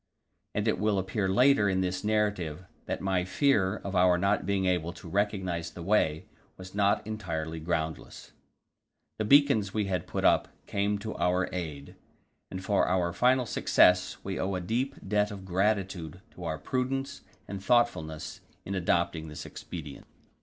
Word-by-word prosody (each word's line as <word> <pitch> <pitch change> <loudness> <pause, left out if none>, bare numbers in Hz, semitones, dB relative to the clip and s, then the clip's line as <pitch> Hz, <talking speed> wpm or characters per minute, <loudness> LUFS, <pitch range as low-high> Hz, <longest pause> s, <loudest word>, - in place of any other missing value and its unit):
And 105 +2 0
it 110 - +1
will 105 -1 +1
appear 95 +1 -1
later 125 0 +4
in 95 0 +1
this 95 0 -2
narrative 105 -6 0 0.2
that - - -3
my 95 -2 +1
fear 100 -1 +2
of 100 -1 -6
our 90 -1 +5
not 100 +3 +1
being 100 -1 +1
able 90 -2 0
to 90 0 -12
recognize 95 -3 -1
the 85 +1 -9
way 80 -5 +1 0.3
was 95 0 -10
not 100 +1 +2
entirely 80 -7 -4
groundless. 80 -1 -4 0.9
The 110 - 0
beacons 115 -6 +4
we 105 -1 +1
had 95 -2 -2
put - - -2
up - - +4 0.2
came 100 +1 0
to 110 +2 -6
our 90 +1 +1
aid, 75 -6 -5 0.6
and 95 0 -6
for 100 -2 +2
our 90 -2 +1
final 125 0 +3
success 90 -4 +3
we 95 -1 -4
owe 95 0 -1
a - - -1
deep 125 +9 -1
debt 105 +1 +2
of 100 -3 -8
gratitude 95 -3 -1
to 90 - -9
our 80 -1 -2
prudence 130 - -2 0.3
and 100 -1 -6
thoughtfulness 100 -10 0 0.2
in 100 - -4
adopting 85 -3 0
this 75 - -8
expedient. 75 -5 -8
95 Hz, 160 wpm, -29 LUFS, 90-105 Hz, 0.9 s, our